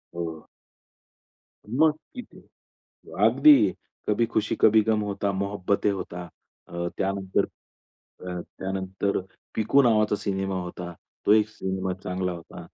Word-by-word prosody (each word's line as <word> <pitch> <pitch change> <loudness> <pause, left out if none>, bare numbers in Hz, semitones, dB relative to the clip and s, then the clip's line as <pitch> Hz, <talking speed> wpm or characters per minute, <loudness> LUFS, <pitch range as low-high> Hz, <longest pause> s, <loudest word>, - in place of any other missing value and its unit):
हो. 80 -2 -5 1.2
मग 155 +6 +4 0.2
किती 250 - -10 0.9
अगदी, 300 -2 +6 0.4
कभी 110 +2 +2
खुशी 110 -2 -1
कभी 110 0 +7
गम 110 -1 +1
होता, 100 -1 -1
मोहोब्बते 100 +1 0
होता 90 -3 -4 0.4
अ, 85 0 -3
त्यानंतर 95 -1 0 0.5
अ, 90 -1 -8 0.2
त्यानंतर 95 +1 -2 0.4
पिकू 135 +6 +4
नावाचा 105 -3 +3
सिनेमा 95 -1 -2
होता. 90 0 -7 0.3
तो 105 - +6
एक 110 0 +4
सिनेमा 95 -3 -3
चांगला 90 0 -2
होता. 85 -1 -10
100 Hz, 115 wpm, -26 LUFS, 90-110 Hz, 1.2 s, कभी